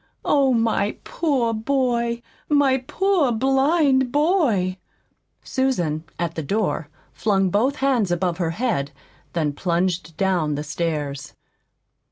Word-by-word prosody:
Oh, 275 Hz, -2 st, +3 dB
my 225 Hz, -3 st, +1 dB
poor 265 Hz, -8 st, 0 dB
boy, 235 Hz, 0 st, 0 dB, 0.3 s
my 280 Hz, -3 st, +3 dB
poor 380 Hz, -9 st, +2 dB
blind 270 Hz, +2 st, +2 dB
boy!" 280 Hz, -, +2 dB, 0.6 s
Susan, 175 Hz, -, -1 dB
at 170 Hz, -1 st, -2 dB
the 160 Hz, -, -3 dB
door, 185 Hz, -2 st, -1 dB, 0.2 s
flung 195 Hz, -3 st, +1 dB
both 250 Hz, +9 st, +2 dB
hands 260 Hz, -8 st, +1 dB
above 175 Hz, 0 st, -1 dB
her 170 Hz, -2 st, 0 dB
head, 205 Hz, -, -1 dB, 0.4 s
then 155 Hz, -4 st, 0 dB
plunged 175 Hz, 0 st, -1 dB
down 175 Hz, -6 st, +1 dB
the 145 Hz, -, -3 dB
stairs. 150 Hz, -3 st, -3 dB
220 Hz, 115 wpm, -22 LUFS, 170-265 Hz, 0.6 s, Oh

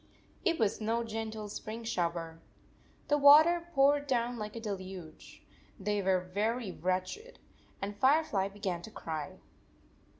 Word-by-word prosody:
It 335 Hz, -4 st, +2 dB
was 220 Hz, -1 st, 0 dB
no 230 Hz, +2 st, 0 dB
gentle 220 Hz, -1 st, -5 dB
spring 220 Hz, +3 st, -6 dB
shower. 170 Hz, -5 st, -2 dB, 0.7 s
The 295 Hz, 0 st, +2 dB
water 315 Hz, +5 st, +7 dB
poured 285 Hz, +1 st, +4 dB
down 240 Hz, -2 st, 0 dB
like 210 Hz, +1 st, -5 dB
a -, -, -4 dB
deluge. 190 Hz, -6 st, -8 dB, 0.4 s
They 205 Hz, +1 st, 0 dB
were 190 Hz, -1 st, +2 dB
very 220 Hz, +1 st, -1 dB
wretched, 185 Hz, -, -3 dB, 0.5 s
and 205 Hz, +1 st, -3 dB
Firefly 260 Hz, -5 st, +3 dB
be 200 Hz, +1 st, -13 dB
gan 180 Hz, -4 st, -2 dB
to 195 Hz, -, -9 dB
cry. 160 Hz, -7 st, -6 dB
215 Hz, 135 wpm, -31 LUFS, 190-250 Hz, 0.7 s, water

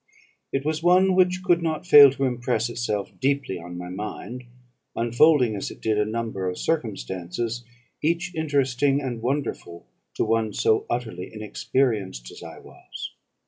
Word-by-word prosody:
It 135 Hz, +1 st, -2 dB
was 155 Hz, 0 st, -1 dB
one 185 Hz, +2 st, +4 dB
which 185 Hz, 0 st, +2 dB
could 175 Hz, -2 st, +3 dB
not 160 Hz, 0 st, -2 dB
fail 145 Hz, -5 st, +10 dB
to 140 Hz, -, -3 dB
impress 120 Hz, -2 st, 0 dB
itself 105 Hz, -4 st, -2 dB
deeply 135 Hz, -9 st, 0 dB
on 85 Hz, +1 st, -8 dB
my 90 Hz, 0 st, -6 dB
mind, 105 Hz, +5 st, -6 dB, 0.5 s
unfolding 120 Hz, +1 st, +4 dB
as 100 Hz, -, -4 dB
it -, -, -11 dB
did 110 Hz, -1 st, 0 dB
a 105 Hz, -, +2 dB
number 110 Hz, -4 st, -3 dB
of 90 Hz, -, -5 dB
circumstances, 110 Hz, -, -3 dB, 0.4 s
each 170 Hz, +4 st, 0 dB
interesting 140 Hz, -3 st, +1 dB
and 125 Hz, -5 st, -4 dB
wonderful 120 Hz, -9 st, -3 dB, 0.3 s
to -, -, 0 dB
one 110 Hz, -1 st, 0 dB
so 110 Hz, -, +1 dB
utterly 110 Hz, -7 st, -4 dB
inexperienced 105 Hz, -, -2 dB
as -, -, -12 dB
I -, -, -9 dB
was. -, -, -10 dB
120 Hz, 150 wpm, -24 LUFS, 105-145 Hz, 0.5 s, fail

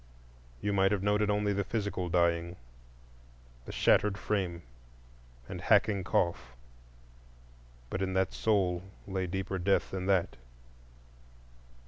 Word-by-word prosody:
You 105 Hz, -, -1 dB
might 95 Hz, 0 st, +3 dB
have 100 Hz, -2 st, 0 dB
noted 105 Hz, +1 st, +2 dB
only 105 Hz, 0 st, +1 dB
the 100 Hz, 0 st, 0 dB
physical 100 Hz, -4 st, -3 dB
dying, 85 Hz, 0 st, +1 dB, 1.1 s
the -, -, -7 dB
shattered 105 Hz, -1 st, +3 dB
frame 90 Hz, -5 st, -2 dB, 0.8 s
and -, -, -6 dB
hacking 100 Hz, -3 st, +3 dB
cough; 85 Hz, -9 st, -1 dB, 1.4 s
but 95 Hz, -, -2 dB
in 95 Hz, -1 st, -1 dB
that 95 Hz, 0 st, +1 dB
soul 95 Hz, -5 st, +1 dB, 0.2 s
lay 95 Hz, -1 st, -2 dB
deeper 95 Hz, +1 st, -3 dB
death 95 Hz, +2 st, +1 dB
than 95 Hz, -1 st, -3 dB
that. 95 Hz, -3 st, +1 dB
95 Hz, 115 wpm, -31 LUFS, 90-100 Hz, 1.4 s, might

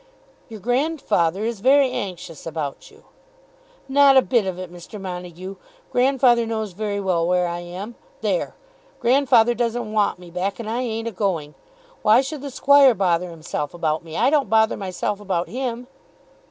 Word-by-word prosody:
"Your 220 Hz, -2 st, -9 dB
grandfather 225 Hz, -, 0 dB
is 230 Hz, -2 st, -3 dB
very 270 Hz, +3 st, +4 dB
anxious 180 Hz, -, -6 dB
about 155 Hz, -4 st, -5 dB
you." -, -, -20 dB, 0.8 s
"Not 275 Hz, 0 st, +6 dB
a 260 Hz, -, +6 dB
bit 235 Hz, -6 st, +1 dB
of 185 Hz, -2 st, -3 dB
it, 185 Hz, -1 st, -8 dB
Mr. 175 Hz, +5 st, -10 dB
Montague. 180 Hz, 0 st, -7 dB, 0.3 s
Grandfather 250 Hz, -2 st, +3 dB
knows 220 Hz, -2 st, -3 dB
very 205 Hz, +2 st, -3 dB
well 180 Hz, -4 st, 0 dB
where 180 Hz, 0 st, +2 dB
I 175 Hz, 0 st, -4 dB
am. 180 Hz, +6 st, -7 dB, 0.3 s
There! -, -, -1 dB, 0.4 s
Grandfather 245 Hz, -2 st, +4 dB
doesn't 235 Hz, -2 st, -2 dB
want 210 Hz, -4 st, +1 dB
me 175 Hz, -1 st, -13 dB
back, 185 Hz, +4 st, -3 dB
and 230 Hz, -, -6 dB
I 235 Hz, +3 st, -1 dB
ain't 225 Hz, -2 st, -3 dB
a -, -, -2 dB
going. 180 Hz, -7 st, -2 dB, 0.5 s
Why 220 Hz, +4 st, +5 dB
should 275 Hz, +1 st, -6 dB
the 285 Hz, -, -5 dB
Squire 275 Hz, -1 st, +5 dB
bother 180 Hz, -2 st, +1 dB
himself 155 Hz, -2 st, -5 dB
about 160 Hz, -2 st, -1 dB
me? 160 Hz, -1 st, -7 dB
I -, -, +3 dB
don't 295 Hz, -3 st, +2 dB
bother 220 Hz, 0 st, +3 dB
myself 195 Hz, +1 st, -3 dB
about 185 Hz, -4 st, -2 dB
him." 245 Hz, 0 st, -4 dB
210 Hz, 165 wpm, -22 LUFS, 180-245 Hz, 0.8 s, Not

